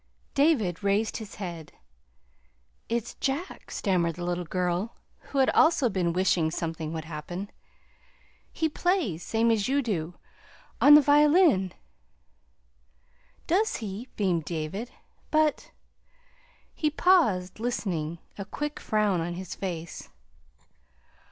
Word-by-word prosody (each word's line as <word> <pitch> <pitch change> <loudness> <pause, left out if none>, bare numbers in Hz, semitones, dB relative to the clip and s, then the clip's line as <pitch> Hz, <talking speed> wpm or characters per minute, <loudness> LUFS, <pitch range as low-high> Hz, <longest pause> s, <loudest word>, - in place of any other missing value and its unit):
David 230 - +2
raised 205 +2 +1
his 215 -3 -9
head. 170 -5 -7 1.2
"It's 235 0 -2
Jack," 290 +7 -3
stammered 175 -5 0
the 175 - -5
little 175 0 -2
girl 180 +5 -1 0.3
who 275 - -1
also 315 -4 +4
had 230 - +1
been 180 -3 +1
wishing 175 -2 +2
something 160 -1 -4
would 160 -1 -5
happen. 170 +5 -6 1.0
"He 320 - 0
plays, 315 - 0
same 230 +5 +1
as 215 -3 +1
you 280 +2 +1
do, 175 -7 -3 0.7
on 295 +1 +9
the 300 - +9
violin." 295 - +4 1.7
"Does 405 +6 +1
he?" 215 +2 -6
beamed 180 -6 0
David. 170 +9 -4 0.4
"But 310 -2 +1 0.5
" - - -34 0.3
He 305 - 0
paused, 230 - +2
listening, 175 -9 -2 0.2
a - - -2
quick 295 +7 -4
frown 210 -5 +1
on 175 +1 -3
his 185 0 -6
face. 170 -4 -6
200 Hz, 120 wpm, -27 LUFS, 175-280 Hz, 1.7 s, on